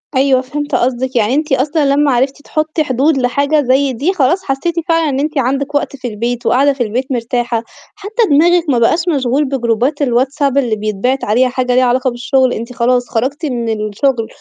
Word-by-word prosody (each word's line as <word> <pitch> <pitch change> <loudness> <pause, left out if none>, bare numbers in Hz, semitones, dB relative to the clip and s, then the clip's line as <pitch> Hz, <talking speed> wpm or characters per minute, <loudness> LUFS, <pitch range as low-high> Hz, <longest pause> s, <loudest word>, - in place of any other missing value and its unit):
أيوه 265 -1 +3
فهِمت 290 +3 -4
قصدِك 255 +1 -1
يعني، 225 +1 +2
أنتِ 300 0 0
أصلًا 290 +3 +1
لمّا 290 -1 +2
عرفتِ 265 +3 0
تحطي 310 +1 -2
حدود 275 +2 +1
لحاجة 280 +4 +1
زي 265 +1 +1
دي 290 +11 -1
خلاص 350 +3 +1
حسيتِ 280 +5 -2
فعلًًا 330 -2 +2
إن 270 - -2
أنتِ 300 +1 -2
عندِك 275 +3 -1
وقت 285 -1 -1
في 260 -2 -6
البيت 235 +2 -3
وقاعدة 275 +3 +3
في 265 - -2
البيت 250 +5 -3
مرتاحة، 240 -1 -1 0.3
حتى 435 +3 -2
دماغِك 340 +4 +4
ما 245 -4 +2
بقاش 235 +8 +3 0.2
مشغول 270 +2 0
بجروبات 260 +2 -1
الواتساب 270 +2 0
اللي 245 -5 +1
بيتبعت 215 +5 -2
عليها 250 +5 +2
حاجة 250 0 -1
ليها 255 0 +4
علاقة 255 +1 +1
بالشُغل، 255 +1 +1
أنتِ 235 +3 -6
خلاص 245 0 0
خرجتِ 265 +7 -2
من 225 -5 -2
الشُغل 230 +2 -1
260 Hz, 185 wpm, -15 LUFS, 245-285 Hz, 0.3 s, دماغِك